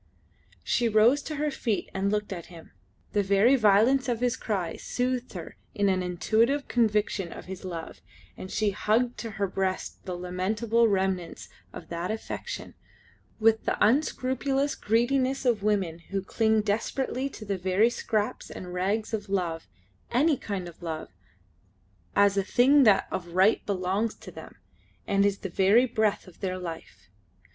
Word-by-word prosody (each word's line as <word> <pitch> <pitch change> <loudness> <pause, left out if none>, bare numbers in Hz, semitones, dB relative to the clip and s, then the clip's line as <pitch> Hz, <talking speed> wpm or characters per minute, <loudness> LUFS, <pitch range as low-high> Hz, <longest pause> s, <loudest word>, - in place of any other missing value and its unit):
She 240 -1 +1
rose 225 +6 +4
to 305 - -5
her 300 +1 -1
feet 230 -6 -2
and 195 +1 0
looked 210 -1 -1
at 170 -3 -8
him. 170 -2 -13 0.4
The 205 - +3
very 200 +6 +4
violence 240 +4 +4
of 235 -2 0
his 250 0 +1
cry 190 -9 -3
soothed 250 0 -2
her 175 -4 -8 0.2
in 205 -2 +2
an 185 -1 +1
intuitive 220 +10 +1
conviction 210 -5 +1
of - - -9
his 190 +1 -8
love, 170 -3 -7 0.3
and 185 - -8
she 210 +1 0
hugged 230 +5 0
to 230 - -4
her 200 - +1
breast 190 0 -3
the 180 -2 -4
lamentable 210 +6 +1
remnants 190 -4 -1 0.2
of 165 - -10
that 170 +1 -3
affection 220 0 -5 0.7
with 220 0 +3
the - - 0
unscrupulous 270 +3 +1
greediness 255 +4 +1
of 235 -4 +2
women 195 -6 0
who 195 -1 -2
cling 220 +1 +2
desperately 255 +5 -1
to 220 - -10
the 200 -2 -2
very 190 +6 +3
scraps 215 -3 -2
and 180 -1 -8
rags 200 +5 -1
of 210 -2 -3
love, 175 -4 -2 0.4
any 290 +5 +3
kind 195 -7 -5
of 170 - -13
love, 160 -2 -5 1.1
as 200 0 +4
a 195 - +2
thing 265 +7 +5
that 205 -3 +5
of 175 -1 -5
right 195 +4 +4
belongs 200 +3 -1
to - - -12
them - - -11 0.5
and 200 0 +3
is 200 -1 -1
the 195 - -5
very 200 +7 +4
breath 220 -4 0
of 185 -3 -16
their 185 -2 -2
life. 165 - -8
205 Hz, 160 wpm, -27 LUFS, 185-235 Hz, 1.1 s, thing